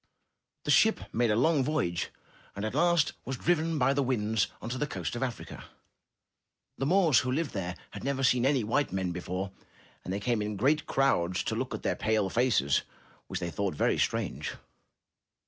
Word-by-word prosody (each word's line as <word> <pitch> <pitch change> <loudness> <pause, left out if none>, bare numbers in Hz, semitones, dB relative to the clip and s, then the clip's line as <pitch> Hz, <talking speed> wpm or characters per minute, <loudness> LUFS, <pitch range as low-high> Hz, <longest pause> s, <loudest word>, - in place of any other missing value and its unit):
The - - 0
ship 220 0 +5
made 120 0 +2
a 105 - +3
long 145 +4 +3
voyage, 90 - -1 0.5
and 100 +2 -3
at 110 - -3
last 170 +1 +3
was 130 0 -4
driven 165 0 +1
by 135 0 +3
the 140 - +1
winds 110 -5 +1
on - - -7
to 130 +1 -3
the 150 - 0
coast 95 - -4
of 120 - -4
Africa. 125 -3 -5 1.1
The 135 - 0
Moors 165 - +5
who 125 +4 -1
lived 155 +2 -1
there 90 -3 -3 0.2
had - - -8
never 135 0 -1
seen 125 -1 +3
any 135 -2 +3
white 130 +7 0
men 95 -2 -1
before, 90 +2 -4 0.5
and - - -5
they 100 - -1
came 115 +1 0
in 105 0 -3
great 140 +9 +2
crowds 90 -10 +1
to - - -2
look - - -2
at - - -8
their - - 0
pale 110 -2 0
faces 100 - +2 0.5
which 95 - -3
they 85 -1 -3
thought 100 -4 -2
very - - +1
strange. - - -1
120 Hz, 190 wpm, -29 LUFS, 100-140 Hz, 1.1 s, ship